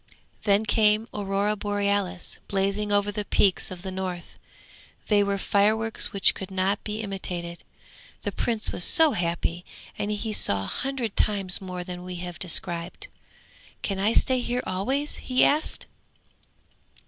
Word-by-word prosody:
Then 205 +1 +3
came 215 +1 +3
the - - -5
Aurora 200 +1 0
Borealis 200 -3 -1
blazing 200 +1 0
over 205 0 +2
the 210 +1 -3
peaks 200 0 +2
of 185 -2 -8
the 190 - -4
north; 185 -2 -5 0.7
they 205 -2 +5
were 200 0 0
fireworks 215 +3 +1
which 200 -1 +3
could 190 - -7
not 190 +2 0
be 215 +1 -3
imitated. 180 -4 -4 0.6
The - - -1
Prince 225 -2 -1
was 175 - -1
so 320 - +7
happy, 170 -2 -1 0.4
and 205 - -1
he 210 +1 -2
saw 100 - +2
a 95 - -4
hundred 265 -6 -2
times 195 -3 0
more 180 -1 -5
than 180 -1 -7
we 180 0 -6
have 175 0 -6
described. 170 0 +1 0.7
'Can 195 -2 -2
I 210 +3 +2
stay 260 +1 +2
here 245 0 -1
always?' 265 +11 -1
he 255 0 +2
asked. 305 +2 +1
200 Hz, 150 wpm, -26 LUFS, 185-215 Hz, 0.7 s, so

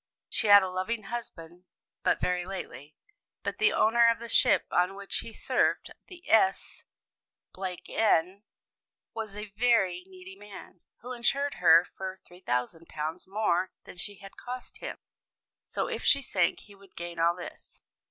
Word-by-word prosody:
"She - - -1
had 205 -1 +9
a 190 - -2
loving 215 +5 -3
husband 180 -6 -8 0.4
but - - +1
very 180 0 0
lately, 175 -5 -8 0.5
but - - -4
the 415 0 +4
owner 235 +1 +4
of 230 - +1
the 235 0 -9
ship - - +7
on 180 +2 +1
which 200 0 -4
he 230 - -8
served, - - 0 0.2
the 355 -2 -14
S 195 -3 +2 0.7
n, 185 0 0 0.7
was 215 -3 -6
a 210 -1 -7
very 205 -6 +2
needy 190 0 -12
man, 200 -3 -13 0.2
who 250 +3 -7
insured 275 +4 0
her 170 0 +6
for 190 0 -6
£3,000 160 +1 -4
more 190 -3 0
than - - -13
she 205 +3 -5
had 195 +1 -14
cost 250 +1 -8
him. - - -6 0.7
So - - -3
if - - -4
she 280 -1 +3
sank 180 -7 0
he 205 - -17
would 195 -1 -20
gain 170 0 -7
all 170 +1 +3
this. 180 - -11
190 Hz, 150 wpm, -28 LUFS, 180-220 Hz, 0.7 s, had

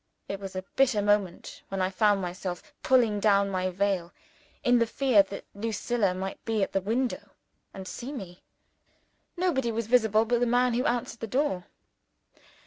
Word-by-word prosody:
It 195 - -4
was 195 -1 -7
a 185 - -3
bitter 265 -5 +3
moment 205 -3 0
when 195 - -4
I 185 0 +1
found 205 -1 +2
myself 180 +8 -5
pulling 235 -5 +3
down 200 -1 +3
my 185 0 0
veil, 185 -2 -1 0.5
in 245 -2 +4
the 230 - +2
fear 250 -3 +4
that 195 0 -7
Lucilla 215 -1 -1
might 190 +1 -5
be 220 -3 0
at - - -2
the 195 - 0
window 235 +6 -2 0.4
and 190 -1 -8
see 250 +7 -6
me! 190 -10 -8 1.0
Nobody 285 -10 +1
was 230 0 -2
visible 220 -2 +3
but 240 +1 +1
the 245 - +2
man 245 +1 +3
who 245 +2 0
answered 235 -1 -2
the 225 - -4
door. 250 -7 0
210 Hz, 170 wpm, -28 LUFS, 195-240 Hz, 1.0 s, in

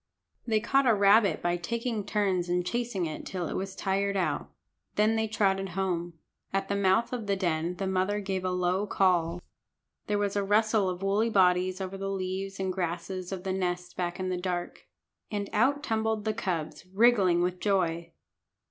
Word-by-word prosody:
They 220 -2 +3
caught 270 +4 +2
a 230 - +5
rabbit 200 -2 +4
by 175 0 +1
taking 230 +4 -2
turns 195 -4 0
in 180 0 +1
chasing 220 -1 -2
it 155 -1 -5
till 180 -3 -4
it - - -4
was 190 0 -4
tired 200 0 0
out. 185 - -1 0.5
Then 215 +2 +3
they 220 0 +1
trotted 195 -3 +1
home. 175 -3 -1 0.4
At 195 0 -1
the 200 - +1
mouth 200 +5 +2
of 230 -4 -4
the 200 - +2
den 175 -2 -1
the 195 - -3
mother 190 +2 0
gave 190 -2 -3
a 185 - 0
low 180 +2 0
call. 175 -3 +1 0.6
There 210 - +1
was 205 -1 -1
a 200 - +1
rustle 210 0 +2
of 180 +1 -5
woolly 205 +4 +2
bodies 185 -2 +3
over 190 0 -5
the 195 0 -3
leaves 195 +1 -3
and 190 -1 -1
grasses 180 +1 -3
of 185 -2 -5
the 190 -1 -1
nest 180 -1 -2
back 175 0 -3
in 185 0 -2
the 180 - -1
dark. 180 -1 -4 0.4
And 205 -2 -3
out 275 +7 +2
tumbled 220 -3 -1
the 215 - +1
cubs, 180 -8 -3
wriggling 195 -5 +4
with 180 0 -1
joy. 175 -5 0
190 Hz, 185 wpm, -28 LUFS, 180-205 Hz, 0.6 s, a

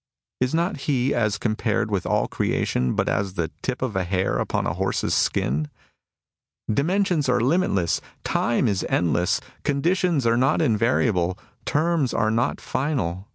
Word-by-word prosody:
Is 125 +4 +1
not 170 +1 0
he, 135 -1 +2
as 105 -3 +1
com 110 +1 -1
pared - - -1
with - - -1
all - - +1
creation, 65 0 0
but - - 0
as 100 -1 -1
the 85 -3 -2
tip 130 0 -3
of 120 -6 -2
a 95 - +1
hair 95 +1 0
upon - - -1
a 75 - 0
horse's 95 +3 -1
skin? 75 +4 0 1.0
'^ - - 0
Dimensions 175 -1 +1
are 125 -1 +3
limitless; 120 - +1 0.2
time 120 +2 +1
is 100 -3 0
endless. 85 +1 +1 0.2
Conditions 165 0 +1
are 115 0 +3
not 130 +2 +2
invariable; 105 -5 +1 0.3
terms 155 -3 +1
are 110 -1 +2
not 115 +3 0
final. 105 - -2
115 Hz, 155 wpm, -24 LUFS, 95-140 Hz, 1.0 s, are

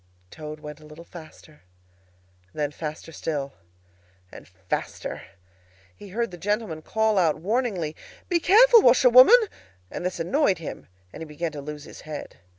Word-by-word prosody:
Toad 155 0 -9
went 150 0 -9
a 155 - -16
little 155 +3 -13
faster; 155 -2 -14 0.9
then 150 -1 -2
faster 155 +1 -7
still, 145 -4 -4 0.8
and - - -13
faster. 95 0 -5 0.7
He 205 - -12
heard 230 +2 -2
the 175 - -10
gentlemen 205 -5 -2
call 220 +3 +1
out 160 -4 +2
warningly, 190 -4 -2 0.3
"Be 350 -2 +1
careful, 455 +6 +7
washerwoman!" 255 - +7 0.5
And - - -6
this 180 -1 -3
annoyed 195 - +1
him, 160 - -8 0.3
and - - -10
he - - -5
began 155 +2 -4
to 145 - -7
lose 150 0 -8
his - - -12
head. 155 -1 -8
165 Hz, 150 wpm, -25 LUFS, 150-220 Hz, 0.9 s, careful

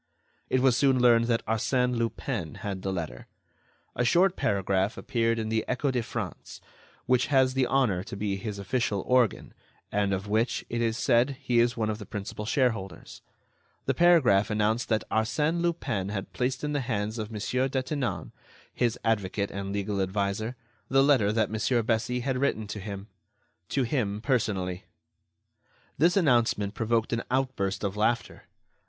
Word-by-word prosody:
It 130 - +2
was 130 -2 +4
soon 135 -1 +3
learned 120 -1 +5
that 115 -1 0
Arsène 125 +3 +1
Lupin 115 - -3
had 95 -2 -3
the 95 - -2
letter. 80 -9 -5 0.7
A 125 - +1
short 180 +8 +4
paragraph 100 -5 0
appeared 115 -1 0
in 110 -1 -2
the 110 0 0
Echo 140 +2 0
de 125 -2 0
France—which 125 +2 -4
has 130 -2 +3
the 130 -1 +1
honor 120 -10 +2
to 100 - -7
be 100 -1 -1
his 100 +1 -5
official 100 0 -1
organ, 125 -4 +2 0.4
and 100 -1 +1
of 95 +1 -2
which, 110 +4 0
it 120 0 -1
is 115 -1 0
said, 130 +3 +2
he 125 -4 +1
is 120 +1 +2
one 110 -1 0
of 105 - -5
the 105 - -9
principal 105 0 -6
shareholders—the 115 -7 -4
paragraph 155 - +4
announced 110 +2 0
that 110 -1 +1
Arsène 150 +10 +1
Lupin 130 - -1
had 100 -2 -5
placed 125 +2 -1
in 150 0 -1
the 145 - +1
hands 110 -2 -2
of 105 -1 -4
Monsieur 125 +4 -1
Detinan, 130 0 -2 0.4
his 120 -2 0
advocate 100 -2 0
and 100 0 -4
legal 100 0 -1
adviser, 100 +4 -1 0.3
the 135 +1 +4
letter 130 -8 +4
that 110 -2 +1
Monsieur 115 +2 +1
Bessy 115 +2 0
had 130 0 -1
written 130 -6 0
to 105 +1 -6
him—to 100 +2 -7
him 115 -5 -1
personally. 105 -7 -1 1.1
This 175 +6 +4
announcement 120 - +2
provoked 115 0 0
an 115 - 0
outburst 125 -8 -1
of 100 -1 -2
laughter. 115 +3 -1
115 Hz, 160 wpm, -27 LUFS, 100-130 Hz, 1.1 s, learned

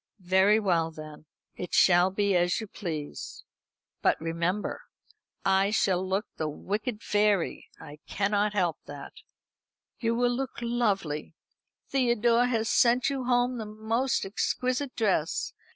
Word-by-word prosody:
"Very 190 +4 +4
well 170 -6 +1
then; 155 -1 -11 0.3
it 180 - -5
shall 175 0 +5
be 200 0 +1
as 175 0 +2
you 220 - -5
please. 160 -7 -6 0.6
But, - - +2
remember, 170 +5 -2 0.6
I 195 +1 +3
shall 190 -3 +1
look 190 +3 -1
like - - -49
the 155 -1 -2
wicked 210 - -4
fairy. 205 -4 +1
I 150 +1 -11
can't 205 +1 +1
help 175 -5 0
that." 145 -1 -9 0.9
"You 230 -2 0
will 245 0 +1
look 265 0 -4
lovely. 200 -11 -1 0.5
Theodore 240 -2 +3
has 225 -3 0
sent 245 +4 +3
you 265 -2 -3
home 245 0 +1
the 220 - -5
most 220 +4 -1
exquisite 255 +6 -1
dress. 195 -9 0
205 Hz, 135 wpm, -28 LUFS, 175-235 Hz, 0.9 s, shall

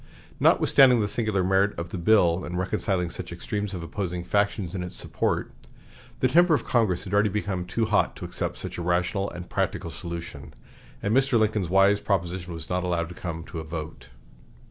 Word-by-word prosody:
Notwithstanding 125 -3 +5
the 105 - +1
singular 105 -3 0
merit 95 +2 +2
of 85 +1 -5
the 90 - -4
bill 90 -2 +3
in 90 - -5
reconciling 95 -1 -1
such - - -6
extremes 100 +3 -4
of 85 - -5
opposing 90 0 -4
factions 100 -1 0
in 95 - -3
its 90 0 -5
support, - - -1 0.7
the 130 - +5
temper 170 +4 +5
of 125 - -3
Congress 110 -8 +1
had 100 -1 -6
already 105 +1 +4
become 95 -3 -2
too 115 +5 -1
hot 105 -1 +1
to - - -7
accept - - -4
such - - -6
a - - -3
rational 90 +3 0
and 90 0 -8
practical - - -2
solution, 85 -5 -7 0.5
and 105 +3 +1
Mr. 135 -2 +3
Lincoln's 105 -5 +1
wise 95 +2 +4
proposition 90 -3 -2
was 85 -1 -6
not 90 0 -1
allowed 85 -2 -1
to - - -8
come 85 -2 -5
to 85 0 -7
a - - -5
vote. 80 -5 -7
95 Hz, 190 wpm, -26 LUFS, 85-105 Hz, 0.7 s, Notwithstanding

